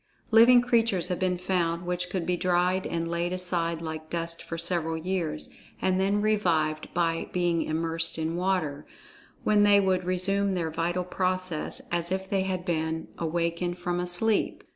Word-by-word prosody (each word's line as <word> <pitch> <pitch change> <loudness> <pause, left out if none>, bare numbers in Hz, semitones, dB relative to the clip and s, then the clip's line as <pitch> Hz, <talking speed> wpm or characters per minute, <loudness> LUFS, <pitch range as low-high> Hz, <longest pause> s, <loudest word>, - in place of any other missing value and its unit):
Living 235 +2 +7
creatures 225 -7 +2
have 180 - -2
been 185 -1 0
found 175 -2 -1
which 180 0 -2
could 180 -2 -2
be 180 - +1
dried 180 +1 +1
and 165 0 -2
laid 170 +1 -2
aside 170 -2 0
like 160 -1 -6
dust 170 0 -4
for 165 - -6
several 165 -1 +1
years, 165 -3 -2 0.3
and 185 0 +1
then 200 +2 +1
revived 165 -8 +1
by 165 -1 0
being 175 -2 +1
immersed 165 +1 -1
in 160 +1 -2
water, 175 -6 -1 0.6
when 210 -1 +3
they 205 -1 +6
would 190 -2 +1
resume 190 +2 0
their 165 -3 -2
vital 175 +3 -1
process 185 -2 -2
as 170 0 -1
if 190 0 -2
they 195 0 0
had 185 -1 -3
been 160 -2 -2
awakened 170 +1 -1
from 175 0 -2
a 180 - -2
sleep. 205 +5 +2
175 Hz, 165 wpm, -27 LUFS, 165-185 Hz, 0.6 s, Living